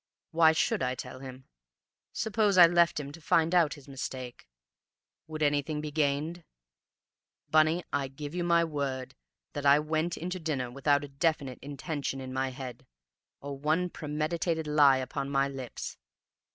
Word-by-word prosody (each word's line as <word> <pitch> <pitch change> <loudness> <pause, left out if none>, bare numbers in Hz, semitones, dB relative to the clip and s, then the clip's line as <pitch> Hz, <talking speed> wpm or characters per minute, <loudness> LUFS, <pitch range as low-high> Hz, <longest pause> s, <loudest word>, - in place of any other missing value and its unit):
Why 160 -1 +6
should 160 - +1
I 125 0 0
tell 125 0 -8
him? 130 -1 -10 0.7
Suppose 210 -3 +1
I 175 - +11
left 170 -1 +3
him 140 -1 -6
to 165 - -12
find 165 +2 +2
out 170 -4 +4
his 145 -2 -15
mistake... 130 - -6 0.8
would 155 -1 -3
anything 145 +1 +1
be 150 0 -5
gained? 155 +3 -1 1.1
Bunny, 155 +3 +4
I 140 - 0
give 145 +3 -8
you 175 0 -1
my 170 -1 +4
word 140 -5 -3 0.4
that 145 - -4
I 140 +1 +8
went 155 +3 -1
in 175 +3 -4
to 185 - -3
dinner 140 -7 -2
without 145 +2 +2
a - - -6
definite 140 -2 -1
intention 140 -1 -4
in 130 -1 -6
my 130 0 0
head, 130 -1 -8 0.5
or 140 0 -5
one 155 +6 0
premeditated 160 +2 -2
lie 145 -3 +5
upon 130 +1 -3
my 135 0 +2
lips. 135 -3 -6
145 Hz, 160 wpm, -29 LUFS, 135-160 Hz, 1.1 s, I